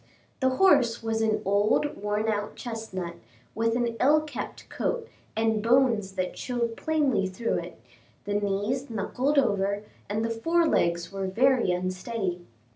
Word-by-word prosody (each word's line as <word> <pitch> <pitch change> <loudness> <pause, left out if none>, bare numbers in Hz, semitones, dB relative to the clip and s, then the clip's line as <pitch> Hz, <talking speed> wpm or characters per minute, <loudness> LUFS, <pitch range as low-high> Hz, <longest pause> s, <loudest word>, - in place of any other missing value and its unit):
The 260 -1 +2
horse 280 -12 +4
was 225 0 0
an 220 -1 +1
old 205 +9 +2
worn 210 +2 -1
out 210 -1 -1
chestnut, 205 -7 -5 0.4
with 230 +1 +1
an 235 -1 0
ill 295 +4 +5
kept 305 -1 -7
coat, 470 -2 -2 0.3
and 220 -1 +1
bones 230 -4 +3
that 185 -1 -2
showed 235 -2 -2
plainly 280 -12 +1
through 190 +5 -1
it, - - -9 0.5
the 205 - -2
knees 205 +6 -1
knuckled 255 +6 -1
over, 200 -5 +2 0.3
and 215 +2 0
the 230 - -1
fore 330 +9 +2
legs 170 - +1
were 195 -1 -3
very 250 +4 +3
unsteady. 185 +1 -2
225 Hz, 145 wpm, -27 LUFS, 200-255 Hz, 0.5 s, ill